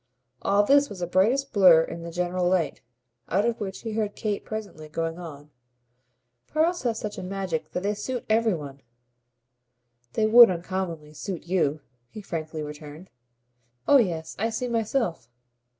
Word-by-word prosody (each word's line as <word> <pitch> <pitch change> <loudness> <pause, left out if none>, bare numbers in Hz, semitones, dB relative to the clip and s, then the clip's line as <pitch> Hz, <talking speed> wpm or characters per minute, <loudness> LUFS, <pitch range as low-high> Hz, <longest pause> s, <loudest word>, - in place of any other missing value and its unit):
All 200 +1 +3
this 285 +5 +4
was 185 -3 -6
a - - +1
brighter 215 +11 +2
blur 180 -5 +7
in 170 - -7
the 170 - -6
general 180 +1 -1
light, 180 -4 0 0.5
out 200 +5 +2
of 235 -1 0
which 195 -2 -5
he 225 - -5
heard 215 -1 -2
Kate 210 -2 -2
presently 200 -8 -7
going 165 +2 -3
on. 150 -4 -10 1.0
"Pearls 335 +3 +1
have 235 -3 -1
such 210 -1 -5
a - - -6
magic 185 -3 -3
that 180 - -2
they 205 +1 +1
suit 240 +4 -4
every 220 -2 +2
one." 140 -3 -8 1.3
"They 220 - +2
would 230 +1 +9
uncommonly 170 -4 -4
suit 180 +2 -6
you," 160 -5 0 0.3
he 215 - -9
frankly 160 -3 -4
returned. 150 +3 -10 0.8
"Oh 285 - +7
yes, 170 -9 -1
I 225 +3 +1
see 230 +3 -3
myself!" 225 - -1
185 Hz, 160 wpm, -26 LUFS, 165-220 Hz, 1.3 s, would